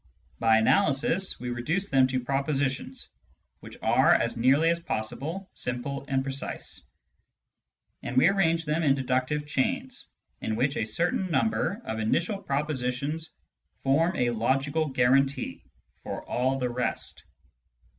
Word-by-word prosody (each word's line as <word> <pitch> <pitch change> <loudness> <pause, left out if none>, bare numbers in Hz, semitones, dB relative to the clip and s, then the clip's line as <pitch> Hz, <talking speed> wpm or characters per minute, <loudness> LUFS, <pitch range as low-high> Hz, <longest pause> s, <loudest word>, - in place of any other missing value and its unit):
By 115 -1 +5
analysis 140 +10 +2
we 125 0 -4
reduce 160 +12 -1
them 130 -1 +4
to 130 0 -1
pro 135 +2 0
positions 135 -2 -2 0.5
which - - -11
are - - +4
as - - +3
nearly 135 +8 +4
as 170 - 0
possible 160 - -4
simple 130 +3 -4
and 135 -1 0
precise, 135 0 -4 1.2
and 125 - -4
we 130 - +7
arrange 170 -4 +2
them 155 +2 0
in 140 -4 +4
deductive 130 +3 -1
chains, 140 -3 -1 0.3
in 110 - -1
which 130 +5 +1
a 110 - 0
certain 175 - 0
number 220 +5 0
of 110 - -3
initial 170 - 0
propositions 145 0 -2 0.5
form 160 +7 +2
a 125 -5 +1
logical 135 +7 +1
guarantee 135 +1 +1 0.4
for - - -6
all 130 +2 0
the 125 -2 -1
rest. 125 0 -3
135 Hz, 135 wpm, -27 LUFS, 125-160 Hz, 1.2 s, we